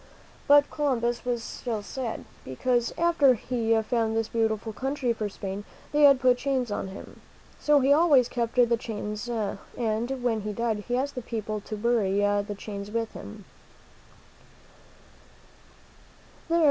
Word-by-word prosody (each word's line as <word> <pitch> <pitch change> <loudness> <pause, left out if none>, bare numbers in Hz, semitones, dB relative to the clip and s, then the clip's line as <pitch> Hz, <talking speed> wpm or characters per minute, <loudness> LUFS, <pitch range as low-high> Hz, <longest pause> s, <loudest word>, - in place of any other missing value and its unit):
But 290 0 +6
Columbus 240 -6 0
was 240 -2 -1
still 225 -2 -4
sad, 240 0 -5 0.2
because 240 - 0
after 330 -6 +4
he 230 0 -1
had 220 -1 +2
found 225 -1 0
this 225 -1 -1
beautiful 220 -1 -1
country 265 0 -1
for 215 -2 -3
Spain, 195 0 -6 0.3
they 295 - +2
had 275 -2 +7
put 250 -1 +3
chains 260 -4 -1
on 205 - -2
him. 190 +1 -11 0.4
So 295 -1 +4
he 275 +2 +5
always 290 -6 +5
kept 235 -2 -2
the 240 -2 +4
chains, 210 0 -5
and 230 +3 -3
when 225 -3 +1
he 210 +1 -4
died, 220 -1 -2
he 245 0 0
asked 280 +2 -1
the 250 - -5
people 215 -2 -4
to 215 +1 -6
bury 210 -3 +1
the 205 0 +1
chains 200 -1 -6
with 225 +1 -2
him. 210 -2 -10
230 Hz, 145 wpm, -27 LUFS, 215-255 Hz, 0.4 s, had